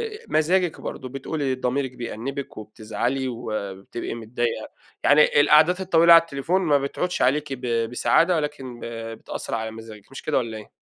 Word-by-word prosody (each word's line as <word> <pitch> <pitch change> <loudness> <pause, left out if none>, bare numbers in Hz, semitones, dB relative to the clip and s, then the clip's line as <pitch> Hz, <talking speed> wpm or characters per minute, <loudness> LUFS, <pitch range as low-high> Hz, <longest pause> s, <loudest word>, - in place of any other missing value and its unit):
آآ - - -10
مزاجِك 170 +2 +1
برضه 130 - -6
بتقولي 135 0 -2
ضميرِك 130 +1 -1
بيأنبِك 125 +3 -6
وبتزعلي 110 +5 -3
وبتبقي 110 -4 -5
متضايقة 115 +1 -3 0.3
يعني 145 0 +5
القعدات 155 +5 +5
الطويلة 170 -2 +6
على 165 - +9
التليفون 165 +4 -1
ما 150 -5 +3
بتعودش 140 +6 -2
عليكِ 140 +2 +1
ب 120 -3 -1
بسعادة 165 +8 +3
ولكن 135 -6 -4
ب - - -7 0.3
بتأثر - - -6
على 110 0 -3
مزاجِك 110 -1 -12
مش 135 - -8
كده 155 - 0
والّا 115 -3 -2
إيه؟ 105 - -12
135 Hz, 155 wpm, -24 LUFS, 115-155 Hz, 0.3 s, على